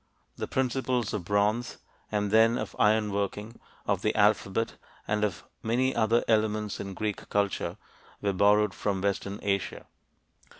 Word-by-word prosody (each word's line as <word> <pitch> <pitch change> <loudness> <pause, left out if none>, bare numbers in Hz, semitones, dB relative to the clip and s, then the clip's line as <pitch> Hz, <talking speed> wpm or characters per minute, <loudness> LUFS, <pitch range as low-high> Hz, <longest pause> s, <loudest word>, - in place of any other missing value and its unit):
The - - -4
principles 130 -3 0
of 90 - -3
bronze 105 +4 +1 0.3
and 105 -1 0
then 115 +2 +5
of - - -5
iron 105 0 +3
working, 105 +3 -3 0.3
of - - 0
the - - 0
alphabet, - - +2 0.3
and 105 0 0
of 100 -5 -1 0.2
many 130 +4 +1
other 115 +1 +3
elements 110 -1 +1
in 95 -1 -5
Greek 105 -2 -3
culture 100 -1 0 0.4
were 100 -1 0
borrowed 105 +1 +4
from 100 -2 -1
western 100 0 -1
Asia. 100 -2 -1
105 Hz, 140 wpm, -28 LUFS, 100-115 Hz, 0.4 s, then